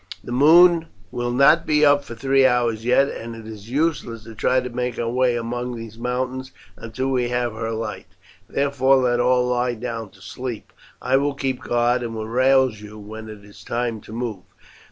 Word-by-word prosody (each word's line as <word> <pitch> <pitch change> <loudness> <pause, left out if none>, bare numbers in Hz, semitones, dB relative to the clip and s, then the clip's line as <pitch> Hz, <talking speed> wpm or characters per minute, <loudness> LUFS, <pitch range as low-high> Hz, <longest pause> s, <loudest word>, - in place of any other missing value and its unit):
The - - -8
moon 165 +5 +6 0.2
will 120 0 -2
not 145 +7 +4
be 150 0 +4
up 145 0 +4
for 120 - -9
three 135 +3 +2
hours 120 -3 +2
yet, 125 +3 +3
and 115 -3 -7
it 115 -1 -11
is 110 0 -10
useless 135 -6 -1
to 115 - -11
try 125 +4 +1
to 125 - -4
make 125 0 -3
our 115 - -2
way 125 +1 +1
among 120 +1 -3
these 115 -1 -9
mountains 130 +2 -3 0.2
until 130 +4 -4
we 125 -2 0
have 120 -1 -1
her 115 +1 -4
light, 110 -1 -5 0.4
therefore 140 -1 +2
let 125 -2 +2
all 125 0 +3
lie 125 0 0
down 115 -2 -5
to 100 - -21
sleep; 115 +3 -7 0.3
I 130 +2 +3
will 140 +1 0
keep 135 -2 -2
guard 120 +1 +1
and 115 -2 -5
will 110 0 -5
rouse 130 -1 +2
you 105 0 -11
when 110 +1 -9
it 105 -2 -11
is 105 - -15
time 115 -2 -3
to - - -14
move." 115 -4 -4
120 Hz, 195 wpm, -22 LUFS, 115-130 Hz, 0.4 s, moon